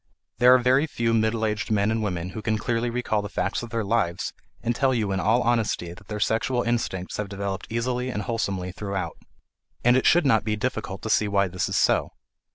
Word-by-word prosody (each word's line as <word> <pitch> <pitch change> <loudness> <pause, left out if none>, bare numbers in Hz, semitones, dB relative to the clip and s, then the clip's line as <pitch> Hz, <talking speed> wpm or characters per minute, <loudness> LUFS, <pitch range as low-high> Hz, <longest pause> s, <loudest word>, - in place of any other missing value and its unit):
There 125 +1 +8
are - - +7
very 130 +4 +3
few 115 -5 0
middle 110 0 +1
aged 105 -1 -2
men 105 0 +2
and 110 0 0
women 90 -4 -2
who 110 - -6
can 110 0 0
clearly 115 +2 -1
recall 115 -3 -1
the 105 - -6
facts 95 +2 -1
of 120 - -7
their 115 0 -1
lives 100 -5 0 0.3
and 120 0 0
tell 130 0 +2
you 105 -4 0
in 95 - 0
all 110 +6 +2
honesty 115 -7 0
that 95 +2 -16
their 105 -1 -4
sexual 120 +4 +1
instincts 115 -6 -2
have 105 -2 -3
developed 100 -1 -4
easily 125 +2 -1
and 105 -4 -3
wholesomely 100 -5 -2
throughout. 100 0 -4 0.7
And 120 +1 +5
it 130 - +3
should 175 -2 +5
not 110 -5 +4
be 105 -1 -1
difficult 105 -4 -3
to 110 - -3
see 105 - +3
why 100 -2 +2
this 90 0 -2
is - - 0
so. - - +2
110 Hz, 220 wpm, -25 LUFS, 100-120 Hz, 0.7 s, There